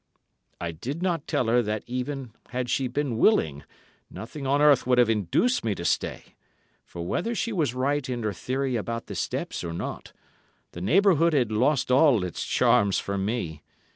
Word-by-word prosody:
I 85 -1 -3
did 135 - -5
not 170 -5 -1
tell 125 - 0
her 120 +2 +3
that 105 -1 -3
even 125 0 -4 0.2
had 125 0 -3
she 135 - +1
been 125 -2 -2
willing, 75 - +3 0.5
nothing 125 +8 -7
on 140 +2 +2
earth 145 -4 +5
would 125 -1 +3
have 120 -2 +5
induced 110 - +1
me 110 -3 0
to 85 - -6
stay, - - -2 0.5
for 85 -1 -8
whether 185 - -1
she 230 0 -2
was 150 - 0
right 140 +1 0
in 120 -2 -3
her 105 -1 -1
theory 130 +6 -2
about 115 +1 -3
the - - -7
steps - - -3
or 85 - -4
not, 85 - -6 0.6
the 85 - -8
neighbourhood 170 - +4
had 125 -6 +2
lost 125 +4 +1
all 130 - +5
its 90 -3 -4
charms 100 -1 +3
for 100 - -3
me. 95 -6 -3
125 Hz, 180 wpm, -26 LUFS, 105-145 Hz, 0.6 s, earth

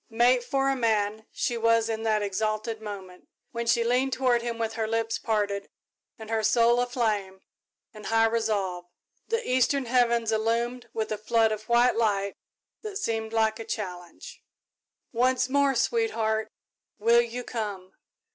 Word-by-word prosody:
Mate 245 +2 +3
for 270 +2 0
a 270 - +2
man 220 -3 0
she 240 -2 -2
was 230 0 +3
in 225 -1 -3
that 215 -2 +1
exalted 215 +2 -2
moment, 190 -4 -9 0.2
when 235 0 -4
she 235 0 +3
leaned 250 +3 +1
toward 250 -3 +2
him 235 -1 -4
with 225 -1 -2
her 220 -1 -2
lips 225 0 -1
parted 205 -2 -1 0.5
and 220 0 -9
her 225 -1 +1
soul 235 +2 +4
aflame 215 -6 -1 0.5
with 215 -1 -9
high 225 0 +3
resolve. 205 -6 -1 0.4
The 460 +1 -2
eastern 260 +2 +2
heavens 235 -2 +2
illumined 230 +3 -1
with 220 -1 -3
a 215 - -2
flood 225 0 +2
of 215 +1 -5
white 240 +1 +4
light 200 -3 0 0.5
that 425 -3 -5
seemed 225 - -2
like 220 0 +1
a - - -4
challenge. 200 - -7 0.7
"Once 250 +1 +2
more, 280 0 +2
sweetheart 220 - 0 0.5
will 230 +2 +5
you 240 +1 -5
come?" 205 -6 -5
225 Hz, 155 wpm, -27 LUFS, 215-240 Hz, 0.7 s, will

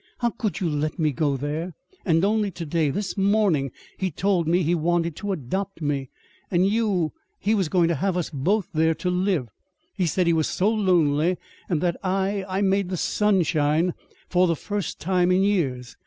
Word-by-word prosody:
"How 235 -1 0
could 215 -3 -3
you 185 - 0
let 150 +1 -1
me 155 -3 +1
go 140 0 0
there? 155 +5 -4 0.3
And 165 0 +3
only 210 0 +1
to 175 -2 -7
day 155 -1 +1
this 200 +7 -3
morning, 195 -8 +2 0.3
he 190 - 0
told 180 0 0
me 175 +2 +3
he 165 +3 +1
wanted 170 -1 0
to 205 -1 -3
adopt 190 +5 -3
me! 140 -4 -2 0.4
And 180 0 +3
you 200 -6 +1 0.3
he 210 +3 0
was 195 -7 +1
going 175 -2 +3
to - - +2
have 180 +4 0
us 175 - -2
both 175 +8 0
there 160 +1 +2
to 180 - -2
live. 180 -7 0 0.5
He 180 - 0
said 180 +3 +1
he 170 - +3
was 160 -1 +1
so 200 +4 +1
lonely, 175 -5 +2 0.3
and 165 -5 0
that 175 -1 0
I 195 +1 0
I 190 +1 -1
made 195 -1 +1
the 185 - -2
sun 205 0 +2
shine 160 +1 +1 0.3
for 180 0 +3
the 165 - +1
first 205 +2 -4
time 180 0 +1
for 180 - +4
years. 165 -11 0
180 Hz, 200 wpm, -24 LUFS, 155-195 Hz, 0.5 s, for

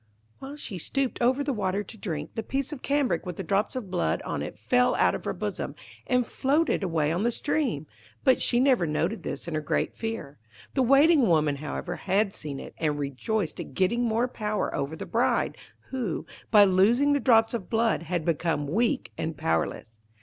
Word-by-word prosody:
While 275 +2 -8
she 215 -10 -6
stooped 270 - -2
over 255 +4 +3
the 280 -1 -1
water 200 -2 -1
to 215 - -11
drink, 160 -8 -5
the 225 - -2
piece 270 +6 -2
of 270 - -8
cambric 275 - +1
with 180 -2 -5
the 190 - -5
drops 200 +6 0
of 220 -8 -5
blood 175 -2 0
on - - -3
it - - -6
fell 250 0 +2
out - - +3
of - - -5
her - - -1
bosom, - - -4 0.3
and 250 -1 +2
floated 290 +6 +1
away 160 -5 0
on 170 +3 0
the 235 - +2
stream; 240 - -1 0.4
but 260 - +4
she 240 - +3
never 250 -9 +3
noticed 165 +8 -1
this - - -5
in 170 - -4
her 155 - -1
great 150 - -1
fear. 225 -11 -5 0.3
The 265 - +2
Waiting 275 +1 +5
woman, 155 -4 +2
however, 170 +4 -4
had 195 +2 +1
seen 145 -3 -6
it, - - -9
and 150 -2 0
rejoiced 150 - -2
at - - -7
getting 205 +6 +2
more 230 +1 +1
power 215 -4 -2
over 140 +3 -2
the - - -6
bride, - - +1 0.4
who, 240 -11 -2 0.2
by 210 -2 +8
losing 215 +10 +4
the 285 - +2
drops 225 -4 +4
of 220 -6 -4
blood, 225 -3 +2
had 170 -1 -2
become 165 -2 0
weak 235 - 0
and 160 -1 -3
powerless. 115 -8 -2
210 Hz, 200 wpm, -27 LUFS, 165-250 Hz, 0.4 s, by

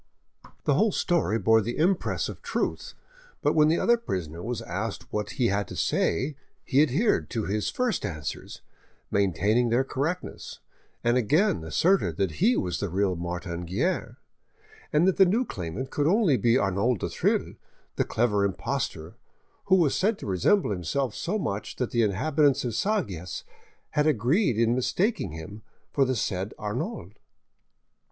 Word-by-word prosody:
The 145 - +2
whole 210 +10 +3
story 170 - +1
bore 110 0 +4
the 120 +3 -4
impress 180 +4 +1
of - - -8
truth, - - -3 0.5
but - - +3
when 150 -1 +5
the 165 +2 +3
other 235 0 +3
prisoner 85 - -4
was 115 +2 -4
asked 100 +2 -5
what 105 0 -2
he 125 -4 +2
had 100 -1 0
to - - -8
say 135 - 0 0.3
he 140 +1 +3
adhered 155 - +2
to 115 -3 -2
his 105 +2 -1
first 250 -2 -1
answers, 75 -4 -6 0.5
maintaining 100 +5 +2
their 120 +3 +3
correctness, 150 +7 -4 0.5
and 120 +1 +3
again 125 - +2
asserted 165 - +2
that 95 -6 -2
he 125 - +4
was 90 -2 -1
the 100 - -2
real 95 +1 +1
Martin 85 0 -4
Guerre, 100 - -2 0.7
and 160 +2 +3
that 190 - +2
the 195 - +8
new 230 +8 +2
claimant 95 - -5
could 145 0 +1
only 190 - +4
be 120 0 +3
Arnauld 100 +3 +1
du - - -3
Thill, - - 0 0.4
the - - +2
clever 105 -3 +1
impostor, 85 -4 -3 0.5
who 190 - +5
was 165 -7 +3
said 210 +3 +1
to - - -9
resemble 100 - +2
himself 105 - -1
so 200 +5 -2
much 105 - -3
that 125 - -2
the 120 - +2
inhabitants 140 +7 +2
of 120 - -1
Sagias 110 - -2 0.5
had 150 +1 +2
agreed 135 - +2
in 115 0 +3
mistaking 150 - 0
him 80 +7 -8 0.3
for 140 - +3
the 130 0 0
said 95 -2 -2
Arnauld. 105 -3 -4
120 Hz, 160 wpm, -26 LUFS, 95-155 Hz, 0.7 s, the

